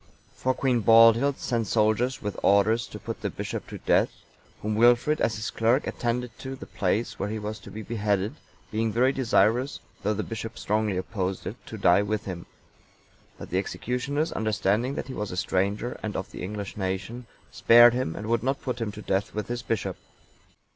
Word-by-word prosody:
For 130 0 0
Queen 125 -2 +1
Baldhild(901) 115 +5 +6
sent 115 -3 -1
soldiers 110 +5 +1
with 105 -1 -3
orders 110 +4 +3
to - - -8
put - - -6
the - - -1
bishop - - -5
to - - -7
death; - - +2 0.5
whom 105 +1 -1
Wilfrid, 120 +7 +4
as 110 - +1
his 105 +1 -4
clerk, 115 +5 +2
attended 120 0 -2
to 135 0 -6
the - - -9
place 100 +4 -1
where 100 - -2
he 110 - -3
was 105 0 -5
to - - -12
be 110 - -7
beheaded, 105 -2 -1 0.4
being 110 0 0
very 125 +4 +3
desirous, 125 0 +2 0.2
though 105 +2 0
the 110 - -2
bishop 115 0 -6
strongly 105 -2 0
opposed 95 -1 -3
it, 105 - -4
to 110 - -7
die 95 -1 +5
with 105 +1 -2
him; 90 -3 -6 0.9
but - - -10
the - - +2
executioners, 140 +6 -2
understanding 110 +4 0
that - - -4
he 135 - -6
was 105 -4 -4
a 90 - -6
stranger, 100 +5 -1
and 110 -1 -4
of 95 - -4
the - - -8
English 100 +2 -5
nation, 95 +5 -4 0.2
spared 120 +1 +7
him, 125 -10 -2
and 105 - -6
would 115 +1 +1
not 135 +3 -1
put 125 -2 -3
him 110 -2 -1
to 105 -1 -9
death 100 +2 -1
with 105 +1 -3
his 120 0 -2
bishop. 115 -4 -2
110 Hz, 195 wpm, -26 LUFS, 105-120 Hz, 0.9 s, spared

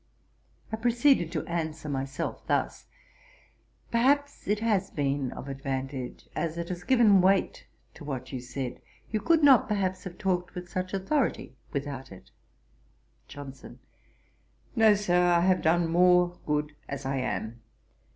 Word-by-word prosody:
I 220 - -2
proceeded 240 - +3
to - - -2
answer 160 -3 -3
myself 135 -1 -3
thus: - - -1 1.0
'Perhaps 285 +5 +1
it 210 +1 +1
has 215 -4 +1
been 140 -2 -1
of 135 - -8
advantage, 135 -1 -5
as 165 -1 -2
it 170 0 -4
has 180 -1 -5
given 220 -5 +5
weight 190 +1 +1 0.3
to - - -12
what 130 -2 -5
you 130 - -3
said: 125 +1 -6 0.3
you 215 - 0
could 330 -2 +3
not, 270 -5 +7
perhaps, 190 -3 -1
have 180 -1 -7
talked 180 -2 -1
with 180 0 -6
such 185 +2 -3
authority 210 - -1 0.2
without 140 -3 -5
it.' 95 - -14 1.0
JOHNSON. 140 -2 -10 1.0
'No, 220 -3 +6
Sir; 180 -3 +2
I 175 -1 +4
have 185 +1 +3
done 170 +1 +3
more 180 +1 +4
good 150 0 -1
as 140 -1 -5
I 135 +1 -1
am. 115 -2 -3
175 Hz, 140 wpm, -28 LUFS, 140-200 Hz, 1.0 s, not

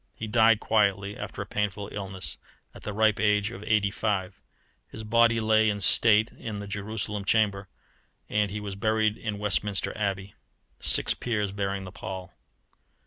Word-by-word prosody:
He 110 - -4
died 110 0 +4
quietly, 100 -2 +1
after - - -6
a - - -14
painful 105 -1 -2
illness, 95 -6 -4 0.3
at - - -13
the 105 - -5
ripe 110 0 +2
age 105 0 +2
of 105 -3 -9
eighty 105 -2 +2
five. 100 -3 -2 0.5
His 110 - -8
body 115 +1 +3
lay 110 0 +3
in 105 -1 -2
state 105 +4 +5
in 110 -3 -7
the 100 - -6
Jerusalem 100 0 -4
Chamber, 100 -2 +1 0.6
and 105 -1 +1
he 105 +2 -4
was 105 -1 -5
buried 110 +1 +1
in 110 -2 -4
Westminster 100 -1 -1
Abbey, 100 -2 -3 0.5
six - - +1
peers 105 -5 -2
bearing 100 -1 -3
the 95 - -8
pall. 95 -1 -7
105 Hz, 160 wpm, -27 LUFS, 100-110 Hz, 0.6 s, state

